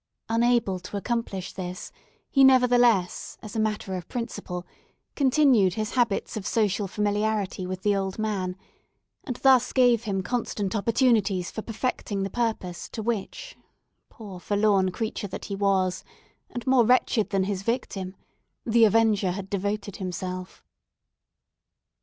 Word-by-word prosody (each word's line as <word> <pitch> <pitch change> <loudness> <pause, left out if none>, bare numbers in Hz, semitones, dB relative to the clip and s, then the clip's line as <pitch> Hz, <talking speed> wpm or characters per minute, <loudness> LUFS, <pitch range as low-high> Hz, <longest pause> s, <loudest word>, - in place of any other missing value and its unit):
Unable 230 -4 +2
to 185 +3 -6
accomplish 205 -4 -3
this, 180 -1 -6 0.4
he 275 - +5
nevertheless, 245 -7 +4
as 215 -1 -9
a - - 0
matter 210 -3 -1
of 180 -2 -6
principle, 195 -7 -5 0.5
continued 260 - +3
his 215 -1 -2
habits 240 -3 0
of 205 -2 -4
social 205 -2 +1
familiarity 205 -1 -1
with 185 0 -5
the 205 -1 +3
old 195 -1 -2
man, 195 -4 -2 0.7
and 250 - -3
thus 260 -2 +5
gave 245 -3 +3
him 195 -3 -1
constant 210 -2 -2
opportunities 215 -4 +2
for 220 - -5
perfecting 220 -3 -3
the 195 - -4
purpose 220 -7 -3
to 220 - -6
which—poor 220 - -7
forlorn 205 -1 +2
creature 215 +1 -4
that 190 - -7
he 200 - -4
was, 190 -2 +1 0.5
and 245 - -6
more 260 -2 +5
wretched 235 -2 +2
than 195 -2 +1
his 190 -1 -2
victim—the 220 +1 -1
avenger 215 -2 +3
had 190 +1 -5
devoted 200 0 -2
himself. 185 0 -5
210 Hz, 130 wpm, -26 LUFS, 190-235 Hz, 0.7 s, he